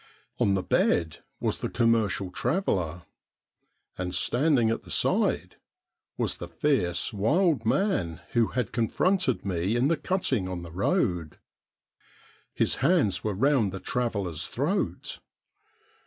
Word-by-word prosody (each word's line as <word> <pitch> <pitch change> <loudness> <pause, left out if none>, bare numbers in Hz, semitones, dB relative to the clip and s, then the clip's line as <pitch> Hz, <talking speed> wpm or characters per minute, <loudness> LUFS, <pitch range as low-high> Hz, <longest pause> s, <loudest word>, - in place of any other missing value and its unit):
On 100 - +3
the 95 - -1
bed 80 -3 +1 0.2
was - - -1
the - - -3
commercial 110 -6 +1
traveller, 90 - -1 1.0
and 90 0 -2
standing 120 - +2
at 115 - -2
the - - -16
side - - +1 0.6
was - - +1
the 85 - -7
fierce, 90 - 0
wild 150 - +1
man 95 - 0
who 120 -3 +3
had 125 -1 -2
confronted 185 - +1
me 95 +3 -1
in 125 +4 +2
the 165 - +2
cutting 135 - -1
on 90 -2 -5
the 85 - -9
road. 85 -2 0 1.2
His - - +1
hands 140 - +2
were 105 -2 -1
round 125 -2 +2
the 95 - -6
traveller's 100 -8 -2
throat. - - -2
105 Hz, 125 wpm, -27 LUFS, 90-135 Hz, 1.2 s, On